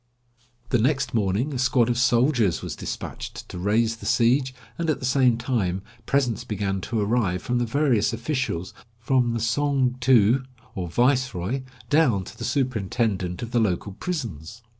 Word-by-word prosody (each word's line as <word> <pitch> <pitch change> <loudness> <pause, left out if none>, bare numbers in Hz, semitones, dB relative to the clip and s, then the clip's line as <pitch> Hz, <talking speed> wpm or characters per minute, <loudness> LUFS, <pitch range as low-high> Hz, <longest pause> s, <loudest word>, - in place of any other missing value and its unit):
The 125 - +2
next 135 +3 +1
morning 110 +6 0
a 130 - -3
squad 130 -2 +3
of 120 - +1
soldiers 120 - +2
was - - -4
despatched - - -6
to 90 - -7
raise 110 +4 +1
the - - -7
siege, 130 +2 +3 0.3
and 165 -1 -1
at 150 - +1
the 130 - -4
same 125 -2 +3
time 105 -7 -1 0.2
presents 125 -5 +1
began 100 -4 -2
to 115 +4 -2
arrive 100 -4 0
from 125 -1 0
the 120 - 0
various 130 -4 +2
officials, 115 - -2 0.2
from 120 0 +1
the - - -1
Tsongtu, 125 -1 +2 0.3
or 90 -2 -4
viceroy, 125 0 +1 0.3
down 140 -11 +3
to - - -11
the - - -8
superintendent 110 - -1
of 120 - -6
the 120 - +2
local 100 -2 0
prisons. 110 - -5
120 Hz, 160 wpm, -24 LUFS, 105-130 Hz, 0.3 s, squad